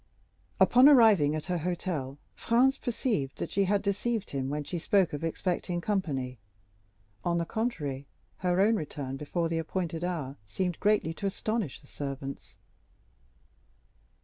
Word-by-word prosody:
Upon 255 +4 +7
arriving 215 - +6
at 155 - -4
her 180 -2 -1
hotel, 165 -5 -3 0.2
Franz 255 +4 +3
perceived 220 - -1
that - - -4
she 200 0 +2
had 200 +1 +1
deceived 210 +2 -1
him 135 -1 -2
when 150 +1 -2
she 175 +4 -4
spoke 190 0 +2
of 145 - -4
expecting 175 +1 -1
company; 140 - -2 0.8
on 170 -1 +1
the 170 - 0
contrary, 150 - -3 0.3
her 180 0 +1
own 220 +3 +4
return 145 -4 -5
before 165 +4 -2
the 165 0 -1
appointed 165 0 -3
hour 155 -7 -3
seemed 175 - -3
greatly 205 -6 +2
to 200 +4 -3
astonish 210 - -2
the - - -20
servants. 140 -1 -6
175 Hz, 145 wpm, -29 LUFS, 145-200 Hz, 0.8 s, Upon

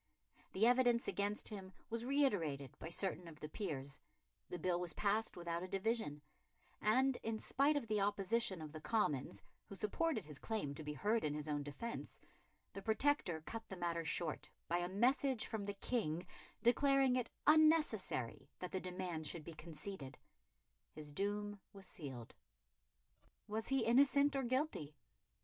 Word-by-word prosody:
The 205 +4 +4
evidence 245 -1 +4
against 205 +1 0
him 190 -3 -7 0.2
was 230 +1 -2
reiterated 180 - +1
by 160 - -5
certain 180 0 -1
of 155 -2 -11
the 150 - -5
peers; 150 -6 -4 0.5
the 180 - -3
bill 175 +1 +1
was 175 -3 0
passed 210 +3 +1
without 170 -1 -2
a 185 - -4
division; 195 -6 -1 0.6
and, 255 +5 +3
in 225 0 -1
spite 280 +6 +2
of 275 - -1
the 215 -2 +1
opposition 200 -2 +1
of 155 - -7
the 155 0 -8
Commons, 145 - 0 0.2
who 200 - -8
supported 220 - 0
his 150 -2 -7
claim 215 -11 -2
to 155 - -6
be 150 0 -3
heard 210 - +1
in 150 -1 0
his 150 0 -4
own 145 -1 0
defence, 145 +12 -6 0.5
the 195 - -6
Protector 220 - +2
cut 225 0 -6
the 190 - -6
matter 170 -1 -1
short 160 0 -2 0.2
by 175 +1 +1
a 175 0 -1
message 250 +4 +2
from 215 -3 -3
the 200 0 -3
King 180 -7 -1 0.4
declaring 270 +1 +5
it 250 -2 0 0.2
unnecessary 305 - +3
that 180 - -5
the 190 - -2
demand 180 -3 -3
should 165 +1 -3
be 165 - -8
conceded. 155 -1 -7 0.8
His 150 -1 -8
doom 205 +4 -2
was 195 -1 -9
sealed. 135 - -7 1.1
Was 220 +1 -1
he 270 -3 +2
innocent 280 +4 +5
or 270 - +2
guilty? 255 - -1
200 Hz, 160 wpm, -39 LUFS, 160-235 Hz, 1.1 s, declaring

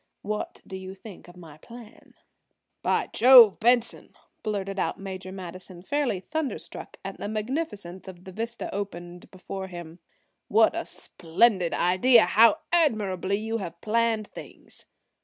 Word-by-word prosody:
What 210 +1 -5
do 190 - -8
you 190 0 -8
think 195 -2 -13
of 175 +1 -15
my 160 -4 -13
plan?" 235 +3 -14 0.7
"By - - 0
Jove, 240 -4 +8
Benson," 240 +1 +1 0.3
blurted 195 -2 -3
out - - -2
Major 190 -1 -7
Madison, 185 -1 -9
fairly 285 -6 -1
thunder 310 - -3
struck - - -9
at - - -7
the - - -4
magnificence 215 - -4
of 180 -1 -11
the 190 - -10
vista 230 +4 -5
opened 175 -3 -7
before 190 +1 -7
him, 175 -2 -10 0.5
"what - - +4
a - - -3
splendid 185 +1 0
idea! 215 +7 +5
How 225 0 +5
admirably 205 - +1
you 225 +2 -3
have 170 -4 -7
planned 225 0 0
things!" - - -12
200 Hz, 140 wpm, -26 LUFS, 185-230 Hz, 0.7 s, Jove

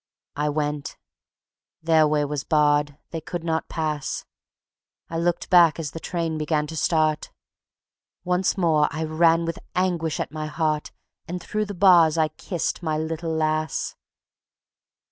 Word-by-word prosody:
I 150 +1 0
went.... 150 -1 -3 0.9
Their 160 -1 +4
way 150 -1 +1
was 145 -1 -3
barred; 145 -1 +2
they 165 - -4
could 170 +1 -5
not 160 -1 -1
pass. 155 -3 -3 0.9
I 165 - -2
looked 175 +1 -1
back 170 -3 +6
as 155 -3 -4
the 165 - -7
train 165 -2 -3
began 150 0 0
to 160 - -8
start; 155 -1 +1 0.9
Once 180 +2 +1
more 160 -5 +3
I 160 +2 -3
ran 165 +1 +3
with 165 0 -4 0.2
anguish 175 -4 0
at - - -3
my 155 0 -4
heart 155 -1 -1 0.4
And 180 +2 -4
through 215 +4 -2
the 205 -1 -7
bars 170 -4 +6
I 155 -1 +2
kissed 170 +4 -3
my 155 -3 -1
little 160 +1 -3
lass. 155 0 -1
160 Hz, 145 wpm, -24 LUFS, 150-170 Hz, 0.9 s, back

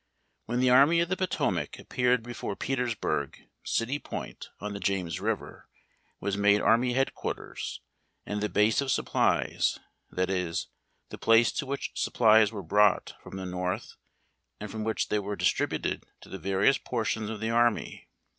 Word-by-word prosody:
When 120 +2 -1
the 130 -1 +4
Army 140 +6 +6
of 170 - -1
the 185 - +1
Potomac 95 - -1
appeared 125 -1 +1
before 120 -4 -5
Peters 125 -2 -1
burg, 70 -8 -3 0.2
City 130 +5 -1
Point, - - -7
on 105 0 -5
the 100 - -5
James 95 -5 -1
River, - - -4 0.5
was 100 -1 -2
made 100 0 +4
army 120 +3 +3
headquarters 135 +1 -3 0.4
and 105 0 -3
the 105 - 0
"base 105 +5 +3
of 140 - -3
supplies," - - +1 0.3
that 95 +1 -1
is, 90 -3 -2 0.4
the - - -9
place 115 -1 +5
to 140 - -3
which 140 +1 -3
supplies 110 -2 +4
were 100 -3 -6
brought 100 +3 +3
from 95 - -9
the 95 - -5
North, 90 +4 -3 0.7
and 105 -1 -6
from 110 0 -4
which 110 0 -1
they 105 - +1
were 100 0 -4
distributed - - 0 0.2
to - - -14
the 95 - -7
various 100 - +2
portions 110 -2 -2
of 110 -1 -5
the 110 +1 -1
army. 120 -1 +1
110 Hz, 165 wpm, -28 LUFS, 100-120 Hz, 0.7 s, Army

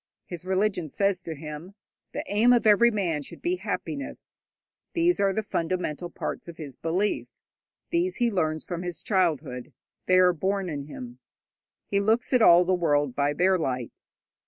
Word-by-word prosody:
His 175 -1 -8
religion 190 -3 0
says 195 +3 +1
to 165 -2 -6
him, 150 +5 -8 0.4
'The - - -3
aim 220 +5 +4
of 240 - +2
every 215 +3 +6
man 180 -9 -1
should 140 - -10
be 355 +1 -1
happiness.' 280 -5 -5 0.5
These 345 +1 +2
are 200 -1 +3
the 220 +3 -2
fundamental 175 -3 -2
parts - - -5
of 170 -1 -9
his 145 -5 -8
belief; 180 +8 -1 0.6
these 350 +2 +1
he 240 -2 +1
learns 160 -5 -1
from 175 -1 -4
his 175 -1 -5
childhood: 160 - 0 0.3
they 185 - +5
are 180 -1 +6
born 190 +2 -1
in 140 -2 -4
him. 125 -4 -9 0.7
He 200 - 0
looks 220 +6 +1
at 250 - +5
all 175 -3 +7
the 185 - +2
world 145 -7 +1
by 145 +1 +1
their 185 +4 +3
light. 125 -6 -3
180 Hz, 170 wpm, -26 LUFS, 155-205 Hz, 0.7 s, all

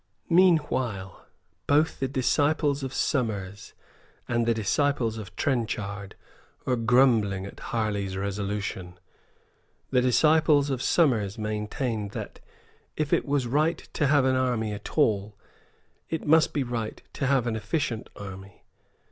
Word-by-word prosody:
Meanwhile, 140 - +2 0.4
both 150 +3 +2
the 135 - 0
disciples 145 +2 +1
of 135 -1 -4
Somers 105 -9 -2 0.5
and 120 -1 0
the 115 - +4
disciples 115 +1 0
of 95 -4 -10
Trenchard 105 -6 -2 0.5
were 130 - +1
grumbling 115 -5 +3
at 100 - -10
Harley's 100 -4 -2
resolution. 100 -2 -4 0.9
The 125 -2 +4
disciples 150 +2 +4
of 130 -2 -2
Somers 115 - +2
maintained 105 0 -3
that, - - -7 0.6
if 155 -2 -1
it - - +2
was 140 -2 +1
right 155 +7 +1 0.2
to 150 - +1
have 140 -2 +4
an 130 0 +3
army 120 -4 0
at 105 +8 -8
all, 105 -7 +1 0.7
it 160 - -3
must 160 +1 +4
be 145 - 0
right 115 -3 -4
to 140 - -2
have 135 -3 +2
an 115 -2 -1
efficient 115 +2 -2
army. 95 0 -10
120 Hz, 130 wpm, -26 LUFS, 105-140 Hz, 0.9 s, the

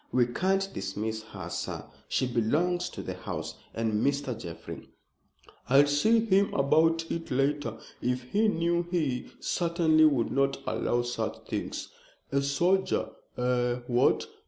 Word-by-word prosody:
"We 125 -1 +4
can't 190 +10 0
dismiss 110 +3 -3
her, 100 -5 -8
sir. - - -4 0.2
She - - +1
belongs 150 +10 +1
to - - -7
the - - -4
house, - - -6
and 110 -1 0
Mr. 140 -3 0
Jeffrey" 85 -6 -8 0.8
"I'll 140 +2 +7
see 215 +11 +3
him 200 -1 +3
about 165 +4 +3
it 165 0 -4
later. 135 -3 0 0.2
If 125 0 -1
he 220 +2 +3
knew 170 -3 +1
he 150 -8 -1
certainly 165 -2 +3
would 135 -7 +2
not 135 0 +1
allow 120 0 0
such 110 -2 -4
things. 105 - -4 0.4
A 140 0 +2
soldier 175 +8 +1 0.3
eh 125 -1 +1
what? 120 0 +3
140 Hz, 135 wpm, -29 LUFS, 120-170 Hz, 0.8 s, I'll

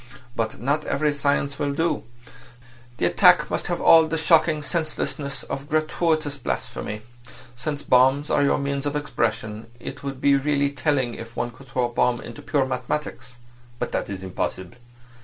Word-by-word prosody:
But 115 -1 -2
not 145 +5 0
every 150 +1 +1
science 140 -1 0
will 145 -1 0
do. 165 -2 0 0.9
The - - +1
attack - - +5
must - - -2
have - - -1
all 160 -1 +7
the 160 - -1
shocking 155 -1 +3
senselessness 150 -4 -3
of 140 +1 -6
gratuitous 155 -1 0
blasphemy. 105 -5 -4 0.5
Since 145 +3 -4
bombs 135 +4 +4
are - - +3
your 140 - +3
means 140 0 -2
of 145 - -2
expression, 115 -6 -2
it - - -7
would 135 -2 -5
be 140 +1 +4
really 140 0 +1
telling 135 -3 0
if 115 0 -9
one 120 - -2
could 135 +3 -16
throw 125 -1 0
a 120 - -5
bomb 120 0 +2
into 115 - -9
pure 140 -4 +1
mathematics. 130 -1 -4 0.4
But - - -3
that - - -2
is 95 -1 -5
impossible. 95 +1 -4
140 Hz, 165 wpm, -24 LUFS, 120-150 Hz, 0.9 s, all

